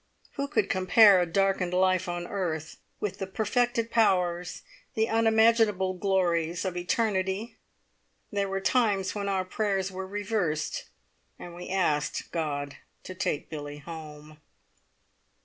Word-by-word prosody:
Who 280 0 -3
could 400 +9 +1
compare 190 +1 +6
a 175 - 0
darkened 190 0 +1
life 185 0 +2
on 175 0 -3
earth 165 -5 -3 0.2
with 210 - -3
the 195 - -3
perfected 230 +3 0
powers, 180 -6 +1 0.3
the 220 0 +2
unimaginable 220 -4 +3
glories 175 -3 0
of 185 -2 -2
eternity? 190 +3 -1 0.7
There 200 -2 -1
were 195 0 -2
times 200 -5 +1
when 200 -1 -3
our 190 -1 0
prayers 195 -1 -1
were 190 0 -6
reversed, 200 -6 -2 0.5
and 175 - -9
we 175 +1 -8
asked 170 -6 0
God 145 -3 -3 0.3
to 185 - -7
take 170 -5 -3
Billie 145 -1 -6
home! 150 -1 -10
190 Hz, 130 wpm, -28 LUFS, 175-205 Hz, 0.7 s, compare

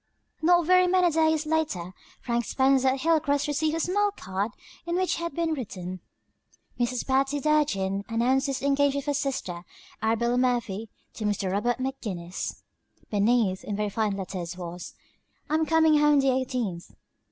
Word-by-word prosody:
Not 345 +1 +4
very 365 +1 +5
many 360 -1 +3
days 315 0 +2
later 295 - -1 0.3
Frank 240 -1 -1
Spencer 265 0 +3
at 260 0 +1
Hilcrest 305 -3 +2
received 305 +2 0
a - - -1
small 410 +5 +2
card 200 - -3 0.4
on 340 - -1
which 370 0 +1
had 335 -4 -4
been 335 -1 0
written: 185 - -6 0.8
"Mrs. 245 0 -1
Patty 270 +2 +1
Durgin 205 -11 +1
announces 260 +4 +1
the 270 - -5
engagement 280 0 +2
of - - -16
her 290 - 0
sister, 270 -11 -3 0.4
Arabella 235 +3 +1
Murphy, 230 -4 0 0.2
to 215 - -5
Mr. 200 -2 -1
Robert 225 +5 0
McGinnis." 210 -10 -5 0.5
Beneath, 205 -2 +2
in 205 - -4
very 210 0 -1
fine 210 -2 -1
letters 180 -2 -5
was: 175 0 -7 0.6
"I'm 315 0 +2
coming 320 -2 +4
home 295 -1 +5
the 270 -1 +3
eighteenth. 250 -9 -2
260 Hz, 150 wpm, -26 LUFS, 205-305 Hz, 0.8 s, very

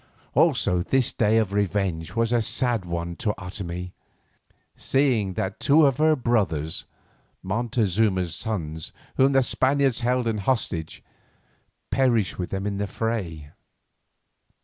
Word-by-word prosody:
Also 90 -1 +3
this 130 +7 +1
day 110 0 +2
of 105 -3 +1
revenge 95 -4 -1
was 115 +1 +1
a 120 - +3
sad 120 -2 0
one 85 0 -4
to 105 -2 -1
Otomie, 90 -1 -6 0.8
seeing 125 -8 +1
that 95 +3 -3
two 150 +2 +5
of 135 -3 +2
her 155 0 +4
brothers, 100 - -1 0.6
Montezuma's 105 - 0
sons 80 -6 -4 0.3
whom 135 +1 +4
the 135 0 +4
Spaniards 135 -1 +2
held 125 +1 0
in 110 -2 -1
hostage, 95 -7 -2 0.9
perished 120 -9 +1
with 90 - -3
them 95 0 -3
in 100 -1 -2
the 100 - -1
fray. 90 -11 -4
105 Hz, 125 wpm, -24 LUFS, 90-120 Hz, 0.9 s, two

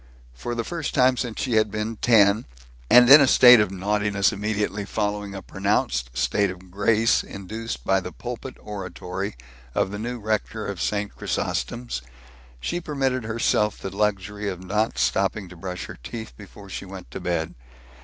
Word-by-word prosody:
For 120 - -5
the 115 - -1
first 165 +3 -4
time 130 -1 +5
since 120 -3 -4
she 120 -5 +1
had 110 0 +3
been 110 +2 -3
ten 105 -2 +4 0.4
and 125 0 +8
in 140 +4 +10
a 140 - +5
state 125 -2 +8
of 105 -2 +2
naughtiness 100 +1 +1
immediately 105 0 -2
following 105 -1 -2
a 95 - -7
pronounced 60 -11 -1
state 65 +12 +2
of 90 0 -10
grace 110 +4 +3
induced 100 - -6
by 95 0 +3
the 90 -1 -7
pulpit 125 +4 -7
oratory 95 -1 -5 0.4
of 95 - +1
the 105 - -5
new 120 +3 -4
rector 110 0 -2
of 100 -3 -4
St. 105 -1 -1
Chrysostom's - - -3 0.6
she 175 - -3
permitted 135 -6 -1
herself 110 -2 +1
the 95 0 -7
luxury 105 0 -1
of 95 -1 -6
not 105 +4 0
stopping 100 +1 0
to 90 - -12
brush 90 +1 -6
her - - -10
teeth 110 - -7
before 100 -1 -13
she 95 - -6
went 95 -1 -10
to - - -6
bed. 85 -3 -2
105 Hz, 170 wpm, -24 LUFS, 95-115 Hz, 0.6 s, in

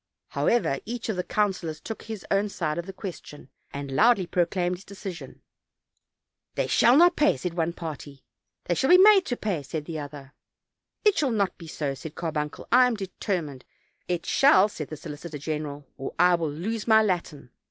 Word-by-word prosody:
However, 230 - +1
each 235 0 -5
of 215 - 0
the 180 - -2
councilors 185 -7 -1
took 225 +6 -7
his 220 -5 -8
own 200 +1 +2
side 165 -4 -2
of 170 - -6
the - - -5
question, 180 -7 -9 0.2
and 140 -1 -6
loudly 210 - +4
proclaimed 180 +1 0
his 190 - -15
decision. 195 -3 -9 1.1
"They - - 0
shall 245 +3 +5
not 350 +2 +6
pay," 300 - +3
said 180 -2 -4
one 170 0 -1
party; 145 -5 -8 0.4
"They 175 - 0
shall 265 - 0
be 360 - +9
made 395 0 +7
to 245 - -2
pay," 195 -8 -2
said 150 +2 -5
the 160 -1 -5
other. 145 -1 -9 0.7
"It 420 -2 +4
shall 290 -4 +2
not 205 -5 0
be 165 - -10
so," 145 -3 -3
said 155 +3 -9
Carbuncle, 150 -3 -4
"I 250 +1 +7
am 245 - -1
determined." 180 - -4 0.4
"It 175 -2 -2
shall,"said 205 - +3
the 155 - -8
solicitor 150 +2 -8
general, 145 -1 -5
"or 135 - -6
I 180 +1 +5
will 165 -3 0
lose 210 +10 -4
my 220 -1 +6
Latin." 170 - -3
175 Hz, 185 wpm, -26 LUFS, 150-215 Hz, 1.1 s, be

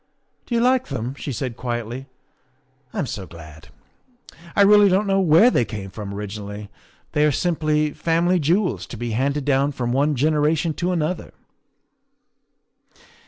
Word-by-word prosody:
" - - -46
Do 240 - -2
you 230 - +2
like 255 +1 +2
them?" 125 -3 -4
she 140 - -7
replied 125 -1 -4
quietly. 120 +2 -4 0.5
" - - -41
I'm - - -2
so 95 -2 -6
glad. 80 -1 -13 0.9
I 200 - +6
really 205 0 +6
don't 190 +3 +2
know 195 -1 +2
where 185 +8 +6
they - - +2
came 100 -4 -7
from 100 -1 -7
origi 105 +1 -6
nally. 105 0 -8 0.4
They 150 -1 +2
are 150 - +4
simply 155 -1 0
family 170 +2 +1
jewels, 175 +6 0
to 120 - -8
be 120 +1 -4
handed 135 +5 -1
down 140 0 +2
from 120 -2 -2
one 145 +4 +2
generation 150 +3 +1
to 175 +4 -2
another." 165 0 -2
145 Hz, 165 wpm, -22 LUFS, 120-170 Hz, 0.9 s, I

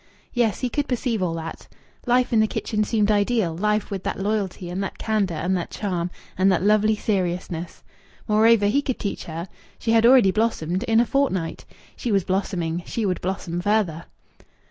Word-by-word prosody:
Yes, 230 -5 +1
he 250 - 0
could 290 +2 -1
perceive 240 -4 -1
all 170 -2 0
that! 165 0 -7 0.4
Life 245 0 +2
in 225 - +5
the 220 - +4
kitchen 215 0 -1
seemed 210 -1 +1
ideal 205 -4 +1
life 210 +3 0
with 195 -2 -3
that - - -3
loyalty 195 -3 -2
and 190 +2 -2
that 195 - -5
candour 205 -7 0
and 180 +5 0
that 175 - -3
charm 180 -4 -2 0.3
and 190 +1 +3
that 180 -1 +1
lovely 215 +1 +4
seriousness! 180 -4 -3 0.4
Moreover, 220 0 +4
he 225 +8 +3
could 260 -3 -2
teach 200 - -4
her. 165 +2 -5 0.3
She 225 - -1
had 230 0 +5
already 245 -6 +6
blossomed 190 -5 0
in 225 -1 +3
a 240 - +4
fortnight. 210 -12 -1 0.3
She 240 - -3
was 195 -2 +3
blossoming. 180 -3 -1
She 230 - -2
would 185 -2 -1
blossom 180 -2 -3
further. 185 -5 0
205 Hz, 185 wpm, -23 LUFS, 180-225 Hz, 0.4 s, already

